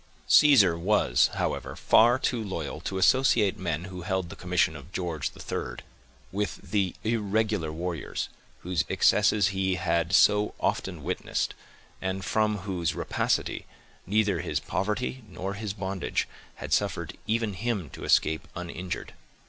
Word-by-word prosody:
Caesar 120 - +7
was, 90 -9 +3
however, - - -2
far 120 +3 +5
too 120 -3 -1
loyal 85 -8 -4
to 95 - -3
associate 110 -1 +3
men 85 -3 -2
who 90 -1 -7
held 95 -1 -2
the - - -8
commission 90 -3 +1
of 75 +5 -11
George 85 -6 -2
III, - - -4 0.6
with 105 +2 -2 0.2
the 100 -4 +1
irregular 110 -5 0
warriors, 85 0 -3 0.3
whose 90 -2 0
excesses 105 -2 +4
he 95 -1 0
had 85 -2 0
so 105 +1 +4
often 90 -6 -2
witnessed, 90 +4 -2 0.5
and 95 0 -3
from 105 -1 +1
whose 90 -5 -1
rapacity, - - -1 0.4
neither 105 0 +2
his - - -1
poverty 105 +7 -2
nor 95 +1 -4
his 105 0 -4
bondage 95 -2 -2 0.3
had - - -4
suffered - - 0
even 110 -1 0
him 100 -3 -2
to - - -9
escape 80 0 +2
uninjured. 90 +1 -5
95 Hz, 135 wpm, -27 LUFS, 90-105 Hz, 0.6 s, Caesar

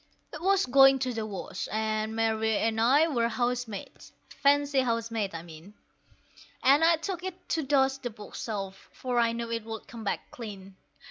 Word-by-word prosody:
It 300 - -7
was 390 +1 +3
going 270 +1 +6
to 255 -1 -2
the 220 -1 -3
wash, 200 -3 -5
and 215 0 -1
Mary 220 -1 +1
and 225 0 0
I 280 +7 +5
were 240 -7 +1
house 245 +1 -1
maids 205 -3 -9 0.2
fancy 285 0 +2
house 230 -2 0
maids, 205 -6 -2
I 165 - -6
mean 170 +4 -13 0.9
And 280 +4 +5
I 335 +1 +6
took 360 +3 -5
it 370 -1 -7
to 325 - +1
dust 270 -1 +2
the 245 - -3
bookshelf, 205 -2 -7
for 250 -2 -2
I 230 -1 +3
knew 230 0 -4
it 230 -1 -2
would 225 -1 -7
come 230 -1 -9
back 200 - -3
clean. 195 -5 -9
230 Hz, 185 wpm, -28 LUFS, 220-270 Hz, 0.9 s, going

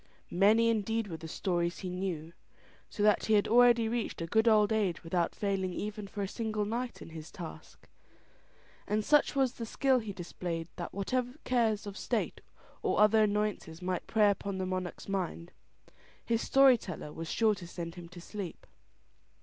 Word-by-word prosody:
Many 215 +5 +4
indeed 225 0 0
were 170 -5 -6
the 160 - -8
stories 175 +1 -1
he 185 - -5
knew, 175 -3 -4 0.6
so 205 - -3
that 210 0 +4
he 220 - +4
had 205 - +3
already 240 -1 +5
reached 230 0 -2
a 165 - -2
good 220 +7 +2
old 215 -1 +5
age 200 -6 0
without 170 0 0
failing 195 -3 -1
even 210 +2 -5
for 200 +1 -4
a - - -2
single 215 0 -2
night 235 +3 -4
in - - -11
his 160 -1 -8
task; 170 -4 -10 1.0
and 210 0 0
such 295 -1 +4
was 265 -3 +2
the 235 - -7
skill 265 +2 +2
he 220 -3 -5
displayed 175 -2 -5
that 175 - -5
whatever 250 +6 -2
cares 225 -4 +1
of 205 -1 -7
state - - -2 0.4
or - - 0
other 215 +1 +6
annoyances 210 -6 0
might 180 -1 -3
prey 210 -2 +4
upon 200 -1 -4
the 190 - -2
monarch's 185 -1 -4
mind, 180 -3 -3 0.7
his 230 -1 +1
story 270 -3 +6
teller 155 -6 -7
was 165 0 -6
sure 220 -2 +3
to 190 -4 -8
send 170 -1 -6
him 175 -1 -10
to 180 0 -11
sleep. 190 0 -7
205 Hz, 180 wpm, -31 LUFS, 175-220 Hz, 1.0 s, other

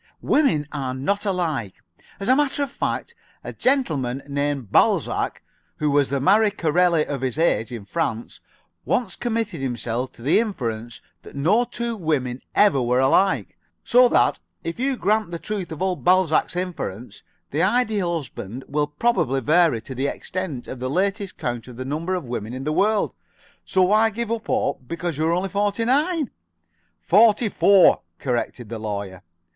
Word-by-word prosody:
Women 245 - +2
are 135 -3 -3
not 200 +10 -1
all 195 - +2
alike. 145 - -2 0.4
As 195 - -5
a 255 - +5
matter 290 0 +1
of 280 - -5
fact, 470 - -3 0.3
a - - -6
gentleman 145 - 0
named 140 -5 -2
Balzac, - - +2 0.3
who 150 -1 0
was 140 -1 +3
the 140 0 0
Marie 205 +9 +4
Corelli 170 -3 +2
of 140 -3 -4
his 130 +1 -2
age 155 -9 +1
in 115 -5 -7
France, 120 -5 -3 0.4
once 215 -7 -1
committed 225 - -2
himself 125 -1 -3
to 115 - -14
the 145 - +4
inference 120 - -3 0.2
that - - -13
no 185 +13 +3
two 235 -1 -4
women 140 - -2
ever 200 -10 +4
were 125 +1 +1
alike, 190 +9 +2 0.3
so 250 +1 +6
that, 120 - +3 0.2
if 165 +6 -5
you 265 0 0
grant 215 -2 +1
the 170 - -4
truth 195 -1 -5
of 160 +3 -4
old 185 -2 -1
Balzac's 180 -3 +3
inference, 165 - -5 0.3
the 150 - 0
Ideal 205 -4 +1
Husband 130 -4 -7
will 145 +1 0
probably 150 - +1
vary 155 -2 +3
to 130 - -8
the 135 +2 -1
extent 170 -6 -5
of 130 - -7
the 130 +1 -3
latest 195 +5 -1
count 120 -1 -4
of 125 -2 -11
the 130 - -5
number 160 +7 -2
of 180 - -3
women 120 -1 -5
in 130 - -5
the 155 +2 -1
world. 210 +4 +2 0.5
So 185 - +2
why 215 +4 +4
give 230 +1 -4
up 230 -1 -3
hope 125 - -1
because 170 -1 -4
you 160 - +2
are - - +2
only 185 +3 -1
forty 205 +3 0
nine?" 295 +3 +1 0.7
"Forty 215 +3 +4
four," 200 -1 +5 0.2
corrected 120 -2 -3
the 115 -1 -5
Lawyer. 100 -4 -5
165 Hz, 175 wpm, -23 LUFS, 130-205 Hz, 0.7 s, so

